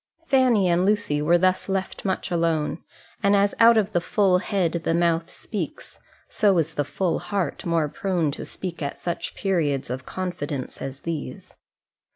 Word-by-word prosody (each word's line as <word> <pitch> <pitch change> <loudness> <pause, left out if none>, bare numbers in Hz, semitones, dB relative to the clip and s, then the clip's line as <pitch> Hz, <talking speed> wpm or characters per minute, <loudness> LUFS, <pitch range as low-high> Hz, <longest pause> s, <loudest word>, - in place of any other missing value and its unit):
Fanny 250 -8 +4
and 175 +1 +3
Lucy 205 -7 +1
were 170 +4 +4
thus 185 +2 +1
left 190 -1 -2
much 190 -2 -2
alone: 165 -2 0 0.4
and 200 +1 +4
as 200 0 +3
out 230 0 +7
of 210 -1 +2
the 175 - +1
full 190 0 +2
head 180 -4 -1
the 165 - +1
mouth 170 -1 +1
speaks, - - -6 0.3
so 200 -4 +2
is 165 -1 0
the 145 - 0
full 165 +5 -1
heart 195 -3 -3
more 165 -2 +2
prone 175 -1 -1
to - - -6
speak 175 -3 -6
at 140 -1 -3
such 175 - -4
periods 150 -10 0
of 130 +1 -5
confidence 155 -8 -4
as 135 0 -6
these. 165 -3 -6
175 Hz, 170 wpm, -24 LUFS, 155-195 Hz, 0.4 s, out